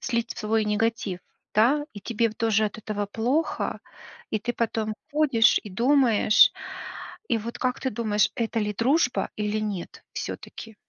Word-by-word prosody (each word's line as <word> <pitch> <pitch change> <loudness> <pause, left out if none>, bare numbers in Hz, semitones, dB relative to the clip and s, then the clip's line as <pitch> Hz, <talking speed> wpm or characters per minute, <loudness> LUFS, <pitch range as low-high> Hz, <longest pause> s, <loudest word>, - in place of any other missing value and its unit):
слить 235 -1 -1
свой 220 0 +1
негатив, 210 -3 -1 0.3
да. 260 +8 +4
И 205 - -9
тебе 230 +3 0
в 215 - -10
тоже 220 -1 +2
от 210 0 -3
этого 205 -1 -3
плохо, 245 +10 -1 0.5
и 215 - 0
ты 240 +3 -3
потом 225 -2 -1 0.2
ходишь 270 -8 +4
и 210 - -9
думаешь. 235 0 +5 0.8
И 230 - +2
вот 230 +2 -6
как 250 -1 -1
ты 260 - -1
думаешь, 210 -2 +1
это 230 0 -1
ли 210 -1 -1
дружба 250 +4 +1
или 210 0 -1
нет 205 -5 -5
всё-таки? 225 -1 -7
225 Hz, 155 wpm, -26 LUFS, 210-235 Hz, 0.8 s, думаешь